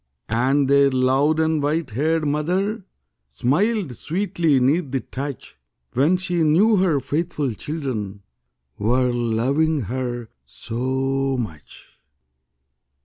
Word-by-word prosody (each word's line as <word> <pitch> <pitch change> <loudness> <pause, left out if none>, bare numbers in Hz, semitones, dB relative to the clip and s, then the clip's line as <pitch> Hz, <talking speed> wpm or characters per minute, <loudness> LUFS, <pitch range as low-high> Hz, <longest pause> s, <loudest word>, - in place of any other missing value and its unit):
And 130 +5 +2
their 140 0 +5
loved 135 +4 +2
and 160 -1 +1
white 150 -1 -1
haired 155 +7 0
mother 180 +8 -1 0.4
Smiled 155 - 0
sweetly 165 - 0
'neath 140 +4 +1
the 135 0 -2
touch, 135 - -7 0.3
When 150 +9 +3
she 180 -2 -1
knew 185 +8 +4
her 180 -6 +2
faithful 145 -1 -2
children 110 -8 -5 0.6
Were 125 +4 +2
loving 130 +7 +1
her 120 0 -4
so 130 - -2
much. 80 - -9
140 Hz, 105 wpm, -22 LUFS, 125-160 Hz, 0.6 s, their